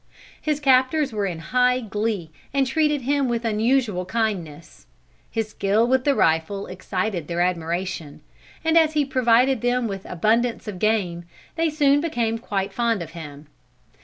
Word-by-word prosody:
His 300 Hz, -1 st, -1 dB
captors 270 Hz, 0 st, +3 dB
were 205 Hz, -2 st, -1 dB
in 175 Hz, -3 st, -4 dB, 0.2 s
high 250 Hz, 0 st, +4 dB
glee, 210 Hz, -6 st, -3 dB, 0.2 s
and 275 Hz, -1 st, +3 dB
treated 300 Hz, 0 st, +1 dB
him 280 Hz, 0 st, +1 dB
with 235 Hz, 0 st, -2 dB
unusual 220 Hz, -3 st, +1 dB
kindness. 175 Hz, -, -4 dB, 0.4 s
His 225 Hz, -1 st, -2 dB
skill 210 Hz, +2 st, +1 dB
with 260 Hz, +1 st, +1 dB
the 285 Hz, -1 st, +3 dB
rifle 165 Hz, +4 st, +1 dB
excited 185 Hz, -2 st, -3 dB
their 170 Hz, 0 st, -1 dB
admiration, 175 Hz, -2 st, -2 dB, 0.4 s
and 325 Hz, +1 st, +5 dB
as 315 Hz, -1 st, +2 dB
he 300 Hz, -2 st, +2 dB
provided 255 Hz, -2 st, +3 dB
them 245 Hz, 0 st, +1 dB
with 195 Hz, -2 st, -6 dB
abundance 225 Hz, +7 st, 0 dB
of 195 Hz, -4 st, -5 dB
game, 185 Hz, -6 st, 0 dB, 0.3 s
they 330 Hz, -1 st, +1 dB
soon 290 Hz, -2 st, +3 dB
became 235 Hz, -8 st, -1 dB
quite 195 Hz, -3 st, -3 dB
fond 230 Hz, -6 st, 0 dB
of -, -, -11 dB
him. 150 Hz, -3 st, -9 dB
225 Hz, 155 wpm, -23 LUFS, 185-260 Hz, 0.4 s, and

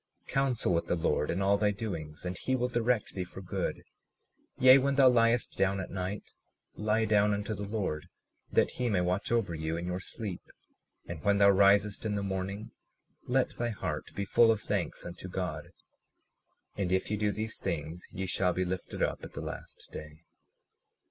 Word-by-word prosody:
37:37 -, -, -11 dB
Counsel 130 Hz, -8 st, +1 dB
with 85 Hz, -, 0 dB
the -, -, +1 dB
Lord 80 Hz, -2 st, 0 dB
in 95 Hz, +3 st, 0 dB
all 100 Hz, +1 st, +4 dB
thy 105 Hz, -1 st, +3 dB
doings, 90 Hz, -8 st, -5 dB
and 90 Hz, +1 st, -2 dB
he 130 Hz, +8 st, -1 dB
will 125 Hz, -1 st, +1 dB
direct 120 Hz, -2 st, 0 dB
thee 95 Hz, -, -2 dB
for 90 Hz, +1 st, -10 dB
good; 95 Hz, -, -3 dB, 0.7 s
yea, 130 Hz, +1 st, +8 dB
when 140 Hz, +1 st, +1 dB
thou 135 Hz, -1 st, +7 dB
liest 120 Hz, -1 st, +3 dB
down 100 Hz, 0 st, +2 dB
at 95 Hz, -, -5 dB
night 95 Hz, +2 st, -4 dB, 0.4 s
lie 110 Hz, +1 st, +1 dB
down 105 Hz, -1 st, +3 dB
unto 105 Hz, +2 st, -3 dB
the 100 Hz, 0 st, -5 dB
Lord, 100 Hz, -8 st, -2 dB, 0.4 s
that -, -, +3 dB
he 125 Hz, -1 st, -1 dB
may 95 Hz, -4 st, +2 dB
watch 90 Hz, +4 st, -1 dB
over 115 Hz, -7 st, +1 dB
you 80 Hz, +1 st, -2 dB
in 85 Hz, -, -4 dB
your 90 Hz, +1 st, -2 dB
sleep; 95 Hz, -1 st, -6 dB, 0.6 s
and 85 Hz, -3 st, -7 dB
when 100 Hz, 0 st, +3 dB
thou 100 Hz, 0 st, +7 dB
risest 100 Hz, +1 st, +4 dB
in 105 Hz, -2 st, -1 dB
the 100 Hz, -, -1 dB
morning 95 Hz, +2 st, -3 dB, 0.6 s
let 130 Hz, +1 st, +2 dB
thy 120 Hz, 0 st, 0 dB
heart 110 Hz, -, -4 dB
be 100 Hz, -, -2 dB
full 115 Hz, +3 st, +5 dB
of 110 Hz, -2 st, +2 dB
thanks -, -, -2 dB
unto 90 Hz, +1 st, -7 dB
God; 90 Hz, 0 st, -4 dB, 1.0 s
and 95 Hz, -3 st, -1 dB
if 95 Hz, +2 st, +1 dB
ye -, -, +2 dB
do 105 Hz, 0 st, +1 dB
these 110 Hz, +2 st, -3 dB
things, 80 Hz, +2 st, -4 dB
ye 95 Hz, 0 st, -3 dB
shall 90 Hz, 0 st, +1 dB
be 95 Hz, +1 st, 0 dB
lifted 90 Hz, 0 st, -3 dB
up -, -, -1 dB
at -, -, -9 dB
the -, -, -6 dB
last -, -, -8 dB
day. 75 Hz, +1 st, -9 dB
100 Hz, 195 wpm, -30 LUFS, 90-110 Hz, 1.0 s, yea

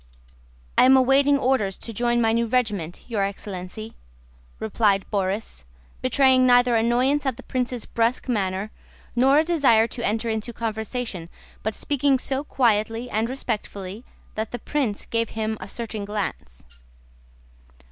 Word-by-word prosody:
"I -, -, +7 dB
am 265 Hz, +1 st, +7 dB
awaiting 275 Hz, +2 st, +4 dB
orders 255 Hz, -8 st, 0 dB
to 230 Hz, -, -7 dB
join 240 Hz, +2 st, +1 dB
my 225 Hz, -1 st, +3 dB
new 230 Hz, 0 st, +1 dB
regiment, 210 Hz, -9 st, -1 dB
your 225 Hz, -4 st, -1 dB
excellency," 195 Hz, +2 st, -5 dB, 0.7 s
replied 205 Hz, -2 st, +1 dB
Borís, 195 Hz, -, -2 dB, 0.4 s
betraying 260 Hz, -, +4 dB
neither 245 Hz, -1 st, +5 dB
annoyance 245 Hz, +6 st, +2 dB
at 265 Hz, -4 st, -1 dB
the -, -, -11 dB
prince's 250 Hz, -2 st, -2 dB
brusque 230 Hz, +3 st, 0 dB
manner 200 Hz, -3 st, -1 dB, 0.4 s
nor 265 Hz, +4 st, +5 dB
a 310 Hz, -, +5 dB
desire 280 Hz, -10 st, +4 dB
to 240 Hz, -, -5 dB
enter 225 Hz, +2 st, 0 dB
into 220 Hz, +1 st, -3 dB
conversation, 220 Hz, -5 st, -4 dB, 0.3 s
but 220 Hz, 0 st, -2 dB
speaking 280 Hz, -1 st, +1 dB
so 265 Hz, +2 st, -2 dB
quietly 230 Hz, -3 st, 0 dB
and 220 Hz, +2 st, 0 dB
respectfully 210 Hz, -5 st, -4 dB, 0.3 s
that 220 Hz, 0 st, -3 dB
the 245 Hz, -, -4 dB
prince 250 Hz, -7 st, -2 dB
gave 230 Hz, -1 st, -1 dB
him 220 Hz, 0 st, -2 dB
a 190 Hz, -, -6 dB
searching 220 Hz, -1 st, -4 dB
glance. 200 Hz, -, -5 dB
230 Hz, 140 wpm, -24 LUFS, 210-255 Hz, 0.7 s, I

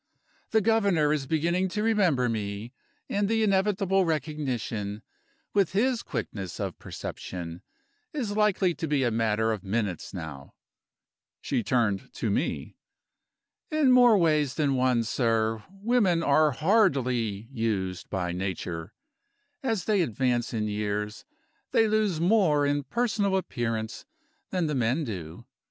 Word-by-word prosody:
The 220 Hz, -, +3 dB
Governor 200 Hz, -9 st, +3 dB
is 140 Hz, -3 st, -2 dB
beginning 170 Hz, +5 st, +1 dB
to 210 Hz, +3 st, -2 dB
remember 185 Hz, -, +3 dB
me, 105 Hz, +1 st, -4 dB, 0.3 s
and 200 Hz, 0 st, 0 dB
the 225 Hz, 0 st, +2 dB
inevitable 195 Hz, -1 st, +2 dB
recognition 130 Hz, -, -2 dB, 0.5 s
with 195 Hz, -3 st, +2 dB
his 240 Hz, +4 st, +2 dB
quickness 95 Hz, -4 st, -5 dB
of -, -, -4 dB
perception 85 Hz, -1 st, -7 dB, 0.5 s
is 245 Hz, -, -3 dB
likely 205 Hz, -4 st, +2 dB
to 165 Hz, -1 st, -4 dB
be 145 Hz, -2 st, +1 dB
a 120 Hz, -, +1 dB
matter 110 Hz, 0 st, +1 dB
of 105 Hz, -3 st, -3 dB
minutes 100 Hz, -4 st, -2 dB
now." 70 Hz, -4 st, -8 dB, 0.8 s
She -, -, -1 dB
turned 110 Hz, -4 st, 0 dB
to 110 Hz, -, -1 dB
me. 135 Hz, -, -2 dB, 0.9 s
"In 310 Hz, -5 st, +3 dB
more 245 Hz, -3 st, +7 dB
ways 155 Hz, -6 st, +2 dB
than 145 Hz, -3 st, +1 dB
one, 125 Hz, -2 st, +2 dB
sir, 115 Hz, -2 st, 0 dB
women 195 Hz, -3 st, +1 dB
are 150 Hz, +1 st, +4 dB
hardly 130 Hz, -, +1 dB
used 105 Hz, -7 st, -2 dB
by 90 Hz, -3 st, -2 dB
Nature. 90 Hz, -1 st, -4 dB, 0.7 s
As 225 Hz, -8 st, -1 dB
they 210 Hz, -3 st, +3 dB
advance 120 Hz, -3 st, 0 dB
in 110 Hz, -3 st, -1 dB
years 105 Hz, 0 st, -3 dB, 0.5 s
they 225 Hz, -, +4 dB
lose 210 Hz, -6 st, +1 dB
more 170 Hz, -6 st, +3 dB
in 145 Hz, -1 st, 0 dB
personal 210 Hz, -4 st, +1 dB
appearance 115 Hz, -10 st, -3 dB, 0.4 s
than 180 Hz, -2 st, 0 dB
the 150 Hz, -, -1 dB
men 130 Hz, +4 st, +1 dB
do. 90 Hz, -, -6 dB
140 Hz, 130 wpm, -27 LUFS, -, 0.9 s, more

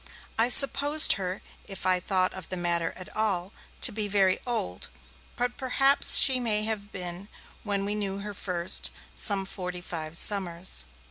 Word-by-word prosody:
I 230 Hz, +2 st, +1 dB
supposed 285 Hz, +4 st, +6 dB
her, 185 Hz, -1 st, -6 dB, 0.2 s
if 195 Hz, -2 st, -10 dB
I 185 Hz, -1 st, +2 dB
thought 185 Hz, 0 st, -1 dB
of 185 Hz, -4 st, -11 dB
the 185 Hz, -, -3 dB
matter 170 Hz, -1 st, -2 dB
at 185 Hz, -, -12 dB
all, 200 Hz, -3 st, -2 dB, 0.3 s
to -, -, +4 dB
be 210 Hz, 0 st, -3 dB
very 195 Hz, -2 st, 0 dB
old, 90 Hz, -, -5 dB, 0.5 s
but 245 Hz, 0 st, -4 dB
perhaps 270 Hz, +2 st, +4 dB
she 265 Hz, -2 st, +7 dB
may 215 Hz, -3 st, +1 dB
have 215 Hz, -1 st, -5 dB
been, 180 Hz, +1 st, -8 dB, 0.3 s
when 200 Hz, -2 st, -3 dB
we 205 Hz, -, -3 dB
knew 200 Hz, -2 st, -5 dB
her 205 Hz, +1 st, -8 dB
first, 180 Hz, -3 st, -1 dB, 0.3 s
some 200 Hz, -3 st, +2 dB
forty 180 Hz, -2 st, -8 dB
five 165 Hz, -2 st, -4 dB
summers. 185 Hz, -3 st, 0 dB
195 Hz, 160 wpm, -25 LUFS, 180-215 Hz, 0.5 s, she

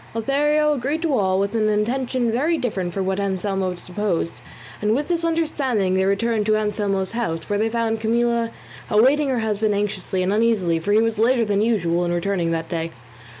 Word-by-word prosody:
Lothario 295 Hz, +5 st, +2 dB
agreed 290 Hz, +5 st, -2 dB
to 310 Hz, -5 st, +1 dB
all 190 Hz, -4 st, +1 dB
with 200 Hz, +2 st, -1 dB
an 215 Hz, -2 st, +1 dB
intention 240 Hz, +3 st, 0 dB
very 300 Hz, +8 st, +1 dB
different 195 Hz, -, -2 dB
from 190 Hz, +2 st, -2 dB
what 190 Hz, +1 st, -1 dB
Anselmo 190 Hz, -1 st, -1 dB
supposed, 180 Hz, -1 st, -3 dB, 0.4 s
and 210 Hz, +1 st, +2 dB
with 290 Hz, +5 st, -2 dB
this 340 Hz, -1 st, 0 dB
understanding 275 Hz, -, 0 dB
they 190 Hz, 0 st, +2 dB
returned 210 Hz, +2 st, 0 dB
to 215 Hz, 0 st, +3 dB
Anselmo's 205 Hz, -3 st, -1 dB
house, 165 Hz, -9 st, -3 dB
where 205 Hz, 0 st, -1 dB
they 220 Hz, +1 st, +1 dB
found 225 Hz, -1 st, -1 dB
Camilla 235 Hz, +1 st, +1 dB, 0.4 s
awaiting 270 Hz, +7 st, +4 dB
her 250 Hz, -3 st, 0 dB
husband 215 Hz, -1 st, 0 dB
anxiously 195 Hz, -2 st, -2 dB
and 190 Hz, +2 st, 0 dB
uneasily, 210 Hz, -7 st, +2 dB
for 170 Hz, +5 st, -2 dB
he 215 Hz, +1 st, +5 dB
was 225 Hz, -1 st, -1 dB
later 235 Hz, +1 st, +3 dB
than 205 Hz, -1 st, +1 dB
usual 175 Hz, -6 st, +1 dB
in 175 Hz, -, -1 dB
returning 175 Hz, 0 st, 0 dB
that 165 Hz, 0 st, -2 dB
day. 165 Hz, -1 st, -3 dB
215 Hz, 190 wpm, -22 LUFS, 190-240 Hz, 0.4 s, he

